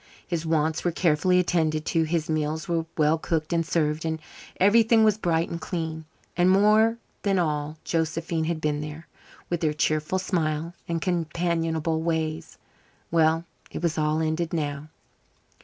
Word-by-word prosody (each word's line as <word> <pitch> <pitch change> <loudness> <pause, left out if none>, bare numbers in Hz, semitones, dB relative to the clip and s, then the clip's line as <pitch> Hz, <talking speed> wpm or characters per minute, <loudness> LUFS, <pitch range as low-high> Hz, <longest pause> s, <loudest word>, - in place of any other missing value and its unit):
His 165 -2 -3
wants 160 0 +1
were 175 - +2
carefully 170 +2 +2
attended 160 -4 +1
to; 165 - +1
his 160 -1 -1
meals 155 0 -1
were 165 -2 -1
well 155 +1 +3
cooked 160 0 -1
and 165 0 +2
served, 155 -1 0
and 160 -1 -2 0.4
everything 225 +3 +5
was 215 -2 +4
bright 170 -5 0
and 170 - -4
clean. 160 -2 -4 0.3
And 175 +1 +4
more 215 +4 +4 0.2
than 195 -2 +1
all, 150 -2 -1
Josephine 165 0 -1
had 165 0 -1
been 150 -1 -1
there, 150 +2 -7 0.4
with 175 - -1
her 155 -2 +1
cheerful 155 +4 0
smile 165 -3 -1
and 165 -1 -2
companionable 165 -2 -1
ways. 160 -1 -2 0.5
Well, 165 0 +3 0.2
it - - -6
was 165 -2 0
all 155 +1 +1
ended 160 +2 -1
now. 150 -2 -3
160 Hz, 155 wpm, -26 LUFS, 155-170 Hz, 0.5 s, everything